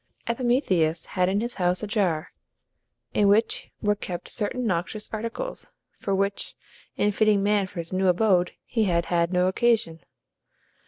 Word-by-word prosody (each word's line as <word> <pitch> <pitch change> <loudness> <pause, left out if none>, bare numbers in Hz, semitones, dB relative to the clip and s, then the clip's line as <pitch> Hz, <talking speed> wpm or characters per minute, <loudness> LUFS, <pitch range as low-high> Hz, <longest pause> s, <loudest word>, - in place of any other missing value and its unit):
Epimetheus 230 - +1
had 180 -1 +2
in 200 +2 +1
his 240 +1 -3
house 180 +3 +1
a - - 0
jar, 190 -7 0 0.8
in 205 - +3
which 215 +3 +2
were 210 0 +3
kept 180 -4 -6
certain 235 +4 -1
noxious 195 +2 -1
articles, 230 - -5 0.3
for 195 - -1
which, 200 +1 -1 0.4
in 210 - +2
fitting 210 -1 +3
man 205 -1 +2
for 185 - -14
his 165 +2 -5
new 190 +1 +2
abode, 180 -1 +3
he 225 -3 0
had 170 -3 +1
had 170 0 +2
no 180 0 +2
occasion. 210 -5 +2
200 Hz, 155 wpm, -25 LUFS, 180-220 Hz, 0.8 s, in